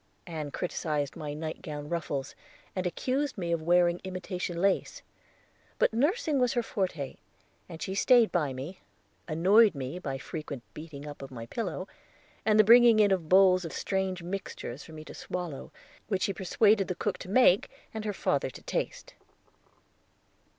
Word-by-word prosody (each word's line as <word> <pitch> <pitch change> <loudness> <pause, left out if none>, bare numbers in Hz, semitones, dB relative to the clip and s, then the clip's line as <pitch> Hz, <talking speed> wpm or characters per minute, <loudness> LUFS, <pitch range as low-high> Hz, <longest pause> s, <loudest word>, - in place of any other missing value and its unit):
Ann 155 -4 -5
criticised 150 -3 -2
my 150 -1 -5
nightgown 155 -1 -5
ruffles, 150 -5 -3 0.4
and 185 -1 0
accused 265 +9 -1
me 175 -3 -2
of 165 -1 0
wearing 175 +1 +3
imitation 180 -2 -4
lace; 195 +1 0 0.7
but - - +3
nursing 300 - +1
was 250 -2 +2
her 240 -2 +1
forte, 180 -11 -3 0.5
and 165 - -7
she 190 - -3
stayed 235 +3 +5
by 150 -6 +1
me, 135 +8 -7 0.5
annoying 195 +7 +5
me 135 +5 -4
by 140 -6 -4
a - - -6
frequent 145 -4 -6
beating 150 -2 -9
up 145 -1 -8
of 135 - -7
my 115 -3 -7
pillow, 185 - -4 0.6
and 215 0 +5
the - - +9
bringing 235 0 +7
in 205 -2 +5
of 175 -5 0
bowls 185 -1 +6
of 165 - -6
strange 190 -2 -2
mixtures 175 -8 -5
for 160 - -13
me 155 0 -9
to - - -10
swallow, 175 -6 -5 0.4
which 195 -3 0
she 195 - +1
persuaded 200 +2 +3
the 180 - -2
cook 205 +3 -2
to 185 - -8
make 205 -3 +5 0.2
and 220 -1 -4
her 210 - -1
father 145 -8 0
to - - -12
taste. - - -3
180 Hz, 165 wpm, -29 LUFS, 155-205 Hz, 0.7 s, the